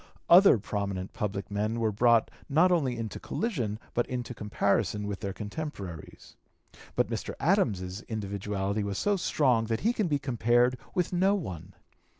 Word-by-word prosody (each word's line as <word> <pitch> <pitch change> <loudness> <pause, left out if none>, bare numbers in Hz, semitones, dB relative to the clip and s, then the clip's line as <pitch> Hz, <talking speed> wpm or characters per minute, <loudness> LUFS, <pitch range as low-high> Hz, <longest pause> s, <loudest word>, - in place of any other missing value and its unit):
Other 185 -5 +8
prominent 100 -2 -4
public 100 -1 -4
men 105 +3 -1
were 110 -2 +1
brought 115 +2 +3 0.2
not 165 +6 +4
only 135 -9 +1
into 110 -2 -5
collision 125 - -2 0.2
but 120 - 0
into 125 -1 -4
comparison 105 -1 0
with 100 -1 -4
their 100 - -3
contemporaries. 105 - -7 0.6
But - - +1
Mr. - - -4
Adams's 95 0 +1
individuality 100 -1 -2
was 100 -1 -3
so 205 0 +2
strong 130 -10 +2
that 115 0 -2
he 230 +3 +2
can 215 -6 0
be 145 -3 +1
compared 125 -1 +2 0.2
with 180 0 0
no 190 +3 +3
one. 90 - -6
110 Hz, 150 wpm, -29 LUFS, 100-140 Hz, 0.6 s, Other